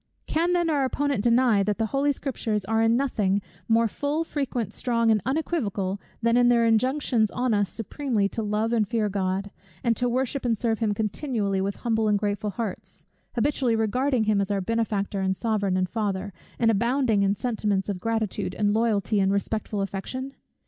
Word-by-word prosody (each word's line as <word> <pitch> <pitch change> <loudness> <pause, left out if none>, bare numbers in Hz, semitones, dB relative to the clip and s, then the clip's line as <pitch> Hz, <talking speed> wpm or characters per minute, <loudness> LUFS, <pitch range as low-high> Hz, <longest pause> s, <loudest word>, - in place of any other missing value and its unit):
Can 340 +3 +1
then 345 -1 +2
our 295 -4 +2
opponent 275 -3 0
deny, 235 -3 +4
that 205 +1 0
the 225 - +1
Holy 280 +1 +2
Scriptures 225 -7 -2
are 225 +2 +1
in 225 +1 +4
nothing 210 -8 +1 0.3
more 230 0 +4
full, 290 +8 -1
frequent, 250 - -3
strong, 230 -2 +1
and 215 -2 +3
unequivocal, 215 - -1 0.2
than 230 0 +3
in 245 0 +5
their 235 -1 +4
injunctions 230 0 +2
on 250 +1 0
us 205 -2 +1
supremely 225 -2 -1
to 225 - -4
love 215 +2 0
and 220 -3 +2
fear 220 -2 0
God, 195 0 -2 0.3
and 235 -1 +2
to 245 -1 +1
worship 260 +2 -1
and 235 -3 +1
serve 225 0 0
him 215 -3 0
continually 210 -2 -1
with 195 +1 -2
humble 225 -2 0
and 210 -1 +3
grateful 205 0 -1
hearts; 215 -2 -6 0.3
habitually 250 -1 +1
regarding 245 +3 +1
him 210 -2 +2
as 195 - -2
our 200 -1 0
Benefactor, 205 -1 -1
and 190 0 0
Sovereign, 205 -4 0
and 185 0 +1
Father, 200 -1 -2 0.2
and 225 -1 +3
abounding 235 0 +2
in 200 0 +2
sentiments 210 -5 -1
of 200 -3 -3
gratitude 220 0 -2
and 205 -1 +1
loyalty, 215 -2 +1
and 195 0 +3
respectful 205 +1 -1
affection? 255 +8 -5
225 Hz, 185 wpm, -25 LUFS, 205-245 Hz, 0.3 s, in